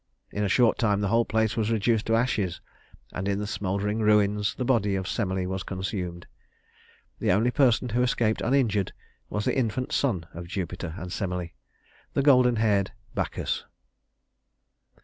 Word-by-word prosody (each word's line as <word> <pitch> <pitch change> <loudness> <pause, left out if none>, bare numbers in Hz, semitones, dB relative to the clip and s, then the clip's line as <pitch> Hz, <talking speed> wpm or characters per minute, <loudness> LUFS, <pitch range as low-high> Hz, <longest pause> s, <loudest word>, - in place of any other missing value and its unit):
In 105 - -2
a 100 - +1
short 120 +3 +3
time 105 -4 +2
the 100 - 0
whole 115 +2 +3
place 110 -1 +1
was 110 -1 0
reduced 110 0 +1
to 115 - +3
ashes, 110 -7 0 0.5
and 95 +2 -3
in 100 -1 +1
the 105 - -2
smouldering 100 +1 -2
ruins 105 -1 +2
the 125 - -3
body 110 -6 +2
of 95 0 -2
Semele 95 -4 -1
was 95 +1 -3
consumed. 90 -2 -4 0.9
The - - +2
only 110 +6 +3
person 125 -2 +3
who 120 +3 +1
escaped 120 -3 +1
uninjured 115 -7 +1 0.4
was 105 0 -2
the - - +1
infant 125 -1 -1
son 100 - 0
of 85 +1 -7
Jupiter 90 -2 -4
and 90 -1 -6
Semele, 90 -3 -3 0.6
the 140 - +2
golden 125 -4 +5
haired 105 -3 +1 0.2
Bacchus. - - -2
105 Hz, 160 wpm, -26 LUFS, 95-115 Hz, 0.9 s, golden